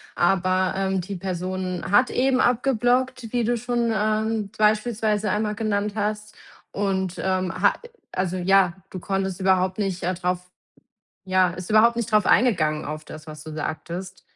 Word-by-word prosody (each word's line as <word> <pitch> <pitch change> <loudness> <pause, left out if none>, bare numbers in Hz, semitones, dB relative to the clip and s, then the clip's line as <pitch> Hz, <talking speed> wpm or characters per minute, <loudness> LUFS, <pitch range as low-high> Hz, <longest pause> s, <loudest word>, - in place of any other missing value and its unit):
aber, 185 +1 +2
ähm, 190 -1 0
die 195 +3 -6
Person 185 0 -3
hat 250 +6 +4
eben 260 0 +2
abgeblockt, 250 0 +1
wie 240 -1 +1
du 240 +2 +1
schon, 240 0 -1
ähm, 215 -1 0
beispielsweise 215 -1 +1
einmal 210 0 -1
genannt 210 -2 -1
hast. 210 0 -3 0.4
Und, 190 -2 -1
ähm, 185 -1 0
ha 195 +4 +3
äh, 475 - -13 0.2
also 185 0 -2
ja, 185 0 +3 0.2
du 185 - -6
konntest 195 -1 -2
überhaupt 185 0 +2
nicht, 190 -3 -2
äh, 185 - 0
drauf 180 0 -3 0.7
ja, 185 -1 +3
ist 180 +1 -8
überhaupt 220 +2 +5
nicht 230 -1 -2
darauf 210 -1 +4
eingegangen 160 -11 +3
auf 155 +1 -5
das, 155 +1 -11
was 155 0 -9
du 155 - -8
sagtest? 170 +4 -5
195 Hz, 160 wpm, -24 LUFS, 185-215 Hz, 0.7 s, überhaupt